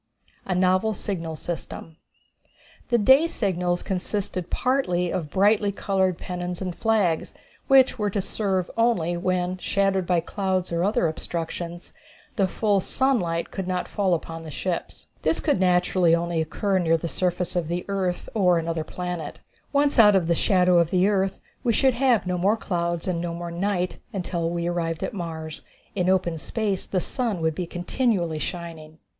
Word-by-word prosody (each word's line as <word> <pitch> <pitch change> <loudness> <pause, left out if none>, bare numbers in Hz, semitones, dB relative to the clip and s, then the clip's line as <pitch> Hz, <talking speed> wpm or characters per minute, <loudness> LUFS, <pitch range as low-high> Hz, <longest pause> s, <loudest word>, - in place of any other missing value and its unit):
A 185 - 0
Novel 185 +4 +2
Signal 165 -5 -4
System. 165 0 -6 0.9
The 240 - +4
day 265 +9 +6
signals 180 - -1
consisted 185 -1 -3
partly 180 -10 0
of 160 -5 -3
brightly 205 +3 +3
colored 190 -3 0
pennons 180 -1 -5
and 185 -3 -4
flags, 210 -8 +1 0.3
which 265 -2 +5
were 210 -1 +1
to 200 - -1
serve 190 -2 -1
only 225 -8 +2
when, 180 +1 -1
shadowed 195 -2 +1
by 180 -2 +3
clouds 185 0 -2
or 170 +1 +1
other 195 -3 +2
obstructions, 170 +2 -5 0.4
the 195 -5 +2
full 205 +1 +1
sunlight 180 -8 0
should 190 -2 -3
not 180 -1 -1
fall 190 -3 +1
upon 165 0 -6
the 160 - -8
ships. 170 +5 -4 0.2
This 160 +1 +1
could - - +1
naturally 180 -2 +3
only 170 -1 -1
occur 190 +5 0
near 165 -2 +3
the 170 - -4
surface 180 +1 -1
of 175 -3 0
the 175 +2 -3
earth 190 -3 -2
or 180 -5 +4
of 165 - -1
another 165 -1 -2
planet. 180 -2 -5 0.3
Once 285 -2 +2
out 210 -3 +8
of 185 -3 +3
the 170 - +2
shadow 180 0 +3
of 170 -1 +2
the 185 +1 +3
earth 195 -2 0 0.2
we 240 -3 +2
should 265 +4 +3
have 240 -6 +2
no 180 -1 -1
more 200 +5 +3
clouds 170 -4 -2
and 175 -2 -1
no 170 -1 -3
more 170 0 -5
night 180 +1 -1
until 175 -3 -2
we 170 0 -2
arrived 170 -2 -2
at - - -3
Mars. 160 -4 -5 0.3
In 180 -3 0
open 175 -3 +1
space 205 +1 -2
the 185 - 0
sun 230 -6 -2
would 160 0 +1
be 175 +2 -4
continually 175 -3 0
shining. 160 -1 -6
180 Hz, 170 wpm, -25 LUFS, 170-200 Hz, 0.9 s, out